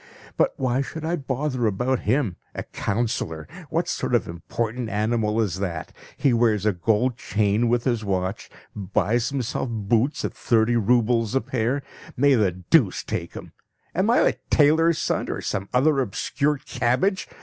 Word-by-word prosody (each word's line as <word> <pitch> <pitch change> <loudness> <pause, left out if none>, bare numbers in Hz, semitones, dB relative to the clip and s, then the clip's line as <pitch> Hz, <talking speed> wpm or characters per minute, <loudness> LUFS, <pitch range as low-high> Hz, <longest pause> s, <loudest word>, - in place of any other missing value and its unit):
But - - +2
why 130 0 +1
should 160 +3 -5
I 170 +2 0
bother 135 -4 -1
about 125 +6 0
him? 115 -7 +1 0.2
A - - -3
councillor! 100 -8 -2 0.2
What - - 0
sort - - -1
of - - +1
important 115 +7 -3
animal 110 0 0
is 100 -5 0
that? 85 -5 -4 0.2
He 140 -4 +2
wears 110 -4 +2
a 105 - +3
gold 115 +7 +1
chain 105 +2 +1
with 120 0 +1
his 120 -4 0
watch, 95 0 -2 0.3
buys 105 +4 0
himself 130 -1 -2
boots 115 +5 0
at - - -3
thirty 115 0 +2
roubles 115 +1 +2
a 135 - +3
pair; 125 +3 -1 0.3
may 140 +2 +5
the 105 -7 +3
deuce 95 - +2
take - - -4
him! - - -9 0.4
Am 190 +5 +1
I 240 - +5
a - - +2 0.2
tailor's 160 +2 +4
son - - -1
or - - -3
some 95 -1 -3
other 140 +3 +3
obscure 140 +5 0
cabbage? 145 +8 0
120 Hz, 160 wpm, -24 LUFS, 105-135 Hz, 0.4 s, may